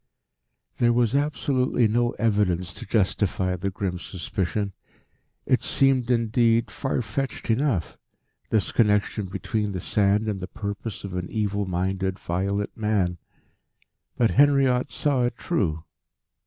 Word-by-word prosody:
There 120 0 +4
was 120 -1 +2
absolutely 140 -4 +1
no 120 +2 +1
evidence 95 -6 0
to - - -9
justify 95 -3 +1
the 100 +2 -2
grim 95 -2 -3
suspicion. 95 +2 -3 0.7
It - - +2
seemed 135 -3 +2
indeed 115 -1 +2
far 135 -2 -2
fetched 120 +3 -3
enough, 115 - 0 0.5
this 110 - +1
connection 105 -2 +1
between 100 +3 -2
the 90 - -3
sand 105 +3 +2
and 105 -3 -2
the 90 - -5
purpose 100 +2 -5
of 100 -2 -6
an 90 -1 -3
evil 105 -2 -1
minded, 95 +1 -1
violent 100 +4 -2
man. 100 -5 0 1.0
But 115 -3 +3
Henriot 135 -2 +4
saw 140 -4 +1
it 120 -1 -2
true. 85 - -1
105 Hz, 130 wpm, -25 LUFS, 95-120 Hz, 1.0 s, There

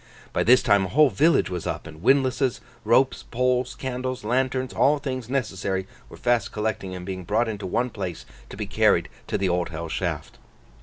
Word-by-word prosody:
By - - +1
this 125 +3 +5
time 100 -2 +4
a - - -5
whole 150 +5 +5
village 155 - +3
was 90 -2 -4
up: - - -3
and 80 0 -11
windlasses, 135 +1 +2 0.2
ropes, 120 +4 +3
poles, 125 0 0
candles, 130 -1 -4
lanterns, 130 +3 0
all 145 +2 +3
things 130 -4 -5
necessary, 95 -7 -2 0.2
were - - -12
fast 120 -1 +1
collecting 105 -3 -3
and 90 -1 -7
being 95 -1 -5
brought 115 +7 +1
into 105 -3 -4
one 120 +6 0
place, 95 -6 -5 0.2
to - - -9
be - - -3
carried - - +2 0.2
to - - -1
the 95 -1 0
Old 90 -1 0
Hell 85 0 -6
Shaft. 70 - -4
120 Hz, 190 wpm, -24 LUFS, 95-130 Hz, 0.2 s, this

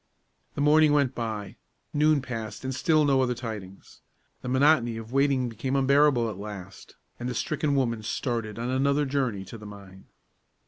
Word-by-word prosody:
The - - -2
morning 150 +1 +5
went 140 -3 +2
by; 110 -4 -5 0.4
noon 150 -1 +3
passed, 115 -3 -6
and 130 0 -3
still 155 +2 +2
no 135 -2 +3
other 125 -1 0
tidings. 105 -6 -8 0.4
The 125 - -5
monotony 130 -3 +3
of 115 +2 -9
waiting 135 -2 +2
became 120 +4 -3
unbearable 140 -2 +4
at 105 -4 -6
last, 100 -2 -9 0.2
and 120 +1 -3
the 125 - -4
stricken 150 +2 -1
woman 115 -5 0
started 115 -1 -3
on 120 +2 -3
another 140 +2 +2
journey 130 -8 -1
to 110 +4 -10
the 105 - -10
mine. 100 -2 -13
125 Hz, 170 wpm, -27 LUFS, 110-140 Hz, 0.4 s, morning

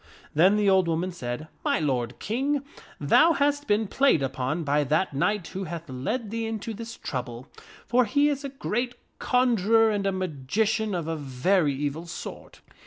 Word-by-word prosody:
Then 185 +7 +5
the 210 -1 +2
old 190 -2 +4
woman 170 +3 -1
said, 125 -6 -5 0.2
<4 - - +1
My - - +1
lord 125 -6 -1
King, 270 +6 -1 0.4
thou 310 - +5
hast 290 0 +1
been 215 +1 +2
played 240 - +3
upon 135 +5 -2
by 145 0 +2
that 155 +5 0
knight 190 +6 0
who 190 0 -5
hath 170 0 -6
led 200 - -3
thee 225 0 -2
into 225 0 -4
this 230 +2 -8
trouble, 125 -1 -5 0.4
for 245 +1 +3
he 285 +7 +3
is 290 -1 -1
a 280 - -4
great 245 -2 -2 0.2
conjurer 225 -3 +3
and 200 -2 -1
a - - +2
magician 190 - -1
of 170 -3 -3
a 165 - -1
very 145 +3 +1
evil 145 +4 -3
sort. 170 - -8
190 Hz, 175 wpm, -26 LUFS, 150-230 Hz, 0.4 s, Then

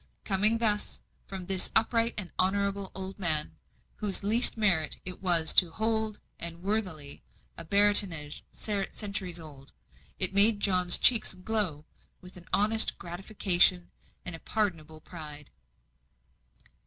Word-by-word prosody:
Coming 210 +4 +3
thus, 210 -3 -1 0.3
from 190 -2 -9
this 190 0 +4
upright 230 +1 0
and 190 -4 -7
honourable 200 +1 -2
old 190 +1 -9
man, 160 -5 0 0.4
whose 205 -3 -3
least 230 +4 +6
merit 175 -8 -1
it 185 0 -6
was 170 -4 +3
to 180 - +5
hold, 220 +3 -4 0.2
and 170 +1 -7
worthily, 185 -9 -5 0.3
a - - -10
baronetage 200 -7 +1
centuries 200 -3 -5
old, 145 -4 -14 0.4
it - - +1
made 205 +2 +4
John's 180 -3 +3
cheek 235 -4 +6 0.2
glow 190 -10 -3 0.3
with 180 0 -16
an 180 -1 -15
honest 220 +2 +2
gratification 180 0 +1 0.3
and 180 - -4
a - - -12
pardonable 160 -8 -5
pride. 150 -4 -11
190 Hz, 125 wpm, -27 LUFS, 170-210 Hz, 0.4 s, least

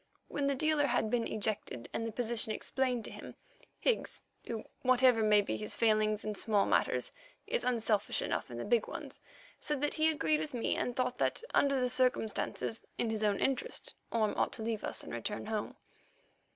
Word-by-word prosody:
When 285 -1 0
the 280 - +2
dealer 305 0 +2
had 240 -3 +1
been 235 -2 +1
ejected 205 - -3
and 230 - -1
the - - -3
position 230 -1 0
explained 250 +1 -1
to - - -5
him, - - -9 0.4
Higgs, 480 - 0 0.2
who 225 -2 -3 0.2
whatever 255 -2 +5
may 210 -1 +5
be 200 - -2
his 210 - -3
failings 215 -1 +2
in 215 - -1
small 205 0 +2
matters, - - +1 0.3
is 480 +3 -1
unselfish 225 -4 +1
enough - - -2
in - - -5
big 485 +1 +3
ones, - - -7 0.4
said 295 -2 -1
that 295 - +1
he 315 0 +3
agreed 160 - +2
with 155 +9 -4
me 235 - 0
and 245 - -1
thought 250 -1 -1
that - - +1
under 275 -1 +4
the 250 - +2
circumstances, 250 -3 0
in 230 - 0
his 220 -1 -1
own 205 -2 +3
interest, 270 -2 -1 0.2
Orme 220 -2 +2
ought - - +1
to 220 - -6
leave 225 -1 -2
us - - -2
and - - -8
return 120 - -3
home. 215 -1 -3
230 Hz, 190 wpm, -33 LUFS, 215-260 Hz, 0.4 s, whatever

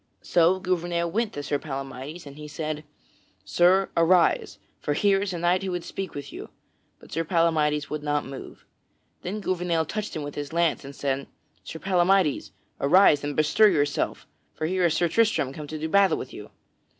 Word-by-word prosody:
So 175 +2 +3
Gouvernail 175 -2 -1
went 225 +3 0
to 145 - -5
Sir 145 0 -1
Palamydes 135 +3 -7
and 140 -1 -10
he 150 0 -9
said: 155 0 -4 0.6
"Sir, 180 - +3
arise, 170 +1 +3 0.2
for 145 - -2
here 195 +3 +3
is 200 -1 -2
a 175 - -4
knight 175 +3 +1
would 175 -1 -3
speak 190 -3 -6
with 140 -1 -7
you!" - - -8 0.5
But - - -17
Sir 165 - -1
Palamydes 155 -3 +1
would 150 0 -3
not 145 0 -1
move. 135 0 -10 0.6
Then 205 +4 -4
Gouvernail 175 -4 0
touched 210 +6 -4
him 155 - -3
with 145 0 -6
his 145 +1 -6
lance, 170 -3 +1
and 140 +1 -10
said: 135 0 -2 0.4
"Sir - - -7
Palamydes, 185 -2 +2 0.3
arise 150 -1 +5
and 145 0 -3
bestir 155 +8 +4
yourself, 145 -5 -1 0.3
for 155 - -3
here 185 +2 +1
is 165 - +2
Sir 175 - +2
Tristram 190 - +1
come 150 +1 -8
to 155 - -5
do 155 +1 -3
battle 195 0 +4
with - - -7
you." - - -9
165 Hz, 185 wpm, -25 LUFS, 145-185 Hz, 0.6 s, arise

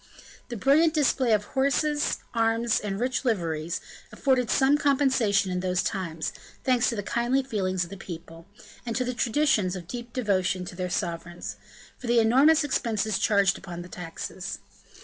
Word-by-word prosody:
The 240 - -4
brilliant 305 +8 +4
display 265 -4 +2
of 210 -1 +3
horses, 280 +4 +1 0.2
arms, 230 0 +2
and 200 -1 -4
rich 255 +3 -1
liveries, 170 -8 -1 0.3
afforded 260 -4 +1
some 270 +1 +4
compensation 265 -9 +2
in 180 - -1
those 180 -1 0
times, 170 -6 -3 0.3
thanks 250 -2 +3
to 235 - -2
the 205 - -3
kindly 240 +6 +1
feelings 190 -7 -1
of 170 - -9
the 195 - -7
people, 165 -2 -9 0.4
and 230 -2 -4
to 255 - 0
the 250 - -2
traditions 230 -7 +1
of 175 -2 -8
deep 240 +3 -7
devotion 190 -6 0
to 180 - -8
their 180 0 -3
sovereigns, 170 -1 -4 0.4
for 250 - -7
the 240 0 +3
enormous 270 +8 +5
expenses 220 -7 0
charged 200 -3 +3
upon 175 -2 -7
the 180 - -12
taxes. 180 +2 -6
220 Hz, 165 wpm, -26 LUFS, 185-255 Hz, 0.4 s, enormous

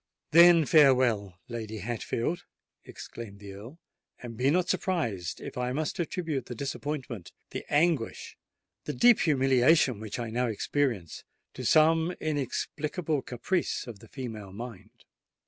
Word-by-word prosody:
"Then 170 0 +8
farewell, 125 - +4
Lady 110 -2 -5
Hatfield," 120 - -3 0.4
exclaimed 110 -4 -9
the 100 -1 -9
Earl; 115 +10 -11 0.5
"and 120 -2 -7
be 125 +4 +2
not 175 +4 +2
surprised 120 - -1
if - - -7
I 125 0 -1
must 155 +4 -2
attribute 160 -6 -2
the 120 - -6
disappointment—the 135 - -6
anguish—the 150 -5 -2
deep 240 - +5
humiliation 135 -3 +3
which 110 -1 -6
I 115 -2 -4
now 125 +2 0
experience, 115 - -2 0.3
to - - -7
some 160 +2 +4
inexplicable 150 +2 -2
caprice 145 +10 -2
of 115 -5 -9
the 115 - -15
female 110 -6 -7
mind. 110 -1 -10
130 Hz, 125 wpm, -28 LUFS, 115-155 Hz, 0.5 s, Then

